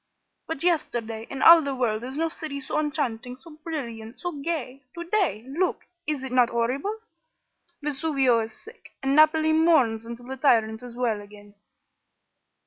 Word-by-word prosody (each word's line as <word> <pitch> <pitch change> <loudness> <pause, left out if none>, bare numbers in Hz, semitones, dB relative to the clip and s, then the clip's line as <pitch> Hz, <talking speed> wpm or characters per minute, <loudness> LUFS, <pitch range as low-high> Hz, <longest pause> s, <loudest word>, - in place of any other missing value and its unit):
But 325 -2 -2
yesterday, 230 -10 -1
in 270 -1 -3
all 335 0 +10
the 280 -2 -3
world 230 -3 -1
is 260 +3 -6
no 325 +1 +1
city 315 -3 -6
so 275 - -2
enchanting, 250 -5 -2
so 295 +6 -15
brilliant, 235 -8 -6
so 355 - -3
gay. 280 -3 -4
To 340 - -5
day 345 - 0
look! 345 +7 -1 0.2
is 295 -4 -2
it 265 - -5
not 250 -2 +4
horrible? 260 - -1 0.9
Vesuvio 275 -4 +2
is 225 0 -3
sick, 450 +2 -15
and 270 +1 +2
Naples 310 +1 +5
mourns 265 -9 +3
until 235 +1 -8
the 265 +1 -6
tyrant 225 -5 +2
is 245 -1 -10
well 235 -4 -1
again." 205 0 -15
265 Hz, 160 wpm, -25 LUFS, 235-315 Hz, 0.9 s, all